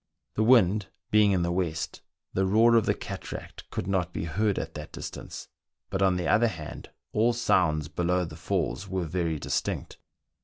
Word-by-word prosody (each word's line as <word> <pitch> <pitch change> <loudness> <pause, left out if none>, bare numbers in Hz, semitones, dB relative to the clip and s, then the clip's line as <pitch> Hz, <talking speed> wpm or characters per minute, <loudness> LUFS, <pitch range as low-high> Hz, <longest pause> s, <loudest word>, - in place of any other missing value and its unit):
The - - 0
wind 105 -4 +5 0.2
being 105 -1 +5
in 90 -3 +2
the 85 - 0
west, 85 -3 -2 0.3
the 95 0 +1
roar 115 +4 +5
of 115 - +4
the - - +3
cataract - - -7
could - - -3
not 95 -2 0
be 80 - -3
heard 100 +5 0
at - - -3
that 75 0 -8
distance, - - -7 0.4
but 95 - -1
on 95 -1 +4
the 90 -2 -1
other 110 +6 +4
hand, 80 -8 -7 0.2
all 115 +3 +3
sounds 80 -10 +2
below 90 +2 0
the 80 -2 -9
falls 90 +2 -2
were 95 -2 -2
very 85 -1 -1
distinct. - - -3
90 Hz, 180 wpm, -28 LUFS, 85-105 Hz, 0.4 s, wind